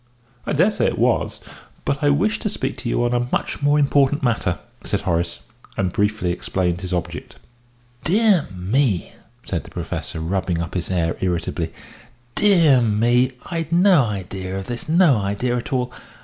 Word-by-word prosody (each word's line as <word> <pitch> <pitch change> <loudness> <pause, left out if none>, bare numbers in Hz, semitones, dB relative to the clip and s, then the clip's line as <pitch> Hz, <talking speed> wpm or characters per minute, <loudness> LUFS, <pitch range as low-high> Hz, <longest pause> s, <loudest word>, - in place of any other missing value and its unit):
"I - - 0
dare 175 +9 +4
say - - +1
it - - -1
was, - - +1 0.4
but 140 - -1
I 145 - +4
wished 180 +10 +1
to 210 - -1
speak - - -3
to 120 - -4
you 120 - +1
on 120 - 0
a 120 0 0
much - - -1
more 145 +1 +3
important 145 0 +3
matter;" 110 -8 +1 0.3
and - - +1
Horace 85 0 -1 0.3
briefly 100 0 0
explained 90 0 -1
his 95 -1 -5
object. 90 -3 -4 0.7
"Dear 200 -2 +3
me," 95 - 0 0.3
said - - -3
the - - -13
Professor, - - -5
rubbing 90 +1 -1
up 85 -1 -4
his 90 -2 -2
hair 85 -3 0
irritably, 90 -3 -1 0.6
"dear 165 - +5
me! 120 +4 +2 0.2
I'd 165 -1 -3
no 175 -3 +5
idea 95 -2 -4
of 95 - -5
this 120 +6 -5
no 165 -6 +5
idea 100 +5 -1
at 120 - -4
all. 125 -2 0
120 Hz, 165 wpm, -21 LUFS, 95-145 Hz, 0.7 s, dear